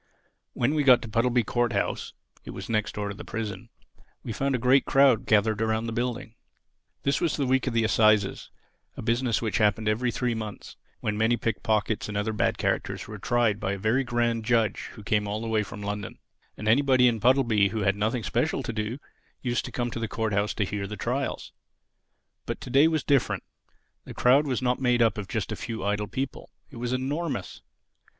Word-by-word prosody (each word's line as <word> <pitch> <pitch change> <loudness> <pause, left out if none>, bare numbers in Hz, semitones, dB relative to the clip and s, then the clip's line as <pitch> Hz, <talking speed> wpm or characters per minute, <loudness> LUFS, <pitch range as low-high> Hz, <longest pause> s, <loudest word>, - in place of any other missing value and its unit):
When 125 +4 +1
we 150 -2 +1
got 130 -3 +6
to - - -6
Puddleby 120 +2 +2
Court 120 +2 0
house 100 - -2 0.3
(it - - -11
was - - -7
next 110 -2 -1
door 105 -1 -3
to - - -4
the - - -9
prison), 105 -4 -5 0.5
we 115 - -4
found 135 +3 0
a - - +2
great 130 +3 +4
crowd 135 -3 +4
gathered 110 0 +3
around 110 0 0
the 115 - -3
building. 120 -1 -3 0.7
This 140 - +1
was 165 -3 0
the 140 - 0
week 130 +1 +1
of 120 - -1
the 115 - +3
Assizes—a 110 -2 0
business 120 +1 0
which 110 - 0
happened 105 0 +2
every 115 +4 +1
three 120 +2 -1
months, 110 -2 -7 0.3
when 105 0 -2
many 115 +2 +3
pick 115 -1 -2
pockets 110 0 0
and 105 - -3
other 105 +2 -1
bad 105 - 0
characters - - -2
were 105 -1 -8
tried 120 -2 +1
by 95 - -1
a - - -3
very 110 +7 +1
grand 120 -2 0
judge 115 -2 +1
who 105 - -11
came 105 0 0
all 105 +1 -2
the 115 - -5
way 110 -1 +1
from 105 0 -7
London. 105 -1 -4 0.4
And 105 - -5
anybody 130 +1 +5
in 115 -2 +1
Puddleby 115 -5 +3
who 110 +1 -3
had 100 0 +2
nothing 110 +3 -1
special 75 -5 0
to 115 - -4
do 110 +3 -3 0.5
used 120 -2 -1
to - - -7
come 120 -1 -2
to 115 - -4
the 115 - -2
Court 110 -2 -2
house 100 +2 0
to 105 - 0
hear 100 0 -4
the 105 +1 -7
trials. 130 +3 -3 1.0
But - - -3
to - - -8
day 140 +4 +6
it 165 - +3
was 155 -4 0
different. 140 -3 +1 0.6
The - - -9
crowd 135 +4 +4
was 130 -1 -1
not 125 +1 +1
made 125 -2 +3
up 110 -2 +1
of 100 - -5
just - - -3
a - - -2
few 110 -4 -5
idle 105 0 0
people. 130 +5 -5 0.2
It - - -10
was 120 +1 -3
enormous. 140 +5 -3
115 Hz, 215 wpm, -26 LUFS, 105-125 Hz, 1.0 s, got